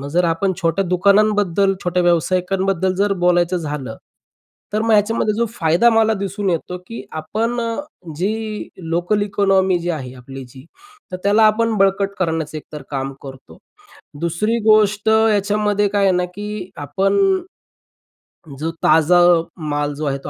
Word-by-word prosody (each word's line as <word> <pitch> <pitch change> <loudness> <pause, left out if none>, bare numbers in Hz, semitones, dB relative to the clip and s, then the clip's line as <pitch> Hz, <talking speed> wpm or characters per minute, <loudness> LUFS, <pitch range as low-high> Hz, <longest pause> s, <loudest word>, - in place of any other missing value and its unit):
मग 140 - -6
जर 175 +4 +1
आपण 170 +4 0
छोट्या 165 +4 +1
दुकानांबद्दल 200 +1 +2
छोट्या 180 0 +1
व्यावसायिकांबद्दल 185 +2 +1
जर 200 +2 +1
बोलायचं 175 0 +2
झालं 145 -8 -5 0.8
तर 215 +1 0
मग 225 - 0
ह्याच्यामध्ये 215 0 +2
जो 235 - +1
फायदा 180 0 +2
मला 225 -1 +3
दिसून 200 0 -3
येतो 175 +1 -3
की 230 - -8 0.2
आपण 230 +9 -2 0.6
जी 215 +4 -3 0.2
लोकल 175 +5 0
इकॉनॉमी 195 -2 +2
जी 175 +1 -3
आहे 130 -6 -5
आपली 135 +1 -10
जी 130 +1 -14 0.5
तर - - -2
त्याला 205 +2 +3
आपण 225 +1 +1
बळकट 195 0 +2
करण्याचं 160 -3 -2
एकतर 150 -1 -10
काम 135 -1 -3
करतो. 135 -1 -12 0.6
दुसरी 170 +8 -1
गोष्ट 215 -1 +3
याच्यामध्ये 210 -1 +2
काय 200 0 0
आहे 195 - +4
ना, 180 - 0
की 205 +1 -7
आपण 195 - +1 1.2
जो 160 - -2
ताजा 160 +3 +4 0.5
माल 145 0 -1
जो 150 +1 -4
आहे 140 -1 -1
तो - - -6
190 Hz, 145 wpm, -19 LUFS, 165-210 Hz, 1.2 s, आहे